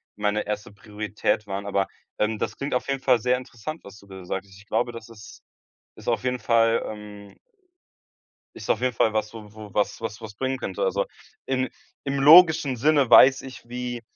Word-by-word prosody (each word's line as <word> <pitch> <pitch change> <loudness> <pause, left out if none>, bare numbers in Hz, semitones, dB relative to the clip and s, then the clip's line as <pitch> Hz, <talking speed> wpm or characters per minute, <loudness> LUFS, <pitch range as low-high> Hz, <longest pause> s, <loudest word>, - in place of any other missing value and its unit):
meine 105 +1 -1
1. 105 0 -4
Priorität 105 0 -3
waren. 100 +1 -4
Aber, 100 -1 0 0.3
ähm, 105 0 0
das - - -3
klingt 140 0 -4
auf 125 - -2
jeden 135 -1 -2
Fall 125 -3 +3
sehr 125 +3 +2
interessant, 130 +5 -8
was 100 +1 -13
du 100 - -19
da 95 -1 -10
sagst. 95 +2 -5
Ich 95 +2 -16
glaube, 120 0 0
das 115 0 -10
ist 105 -2 -14 0.5
ist - - -6
auf - - 0
jeden 125 -1 -1
Fall, 115 -1 +2
ähm 105 -1 -10 1.2
ist - - -7
auf 110 - +2
jeden 130 -1 +1
Fall 110 -1 +2
was, 110 0 -2
wo 105 -2 -11
wo 105 -2 -12
was 105 - 0
was 115 -1 -5
was 110 -2 -9
bringen 130 +3 -2
könnte. - - -4
Also, - - 0 0.4
im 130 -1 0 0.4
im 140 0 -2
logischen 155 -3 +7
Sinne 140 0 +3
weiß 130 +3 +7
ich, 130 -2 -11
wie 125 -1 -5
115 Hz, 195 wpm, -24 LUFS, 105-130 Hz, 1.2 s, logischen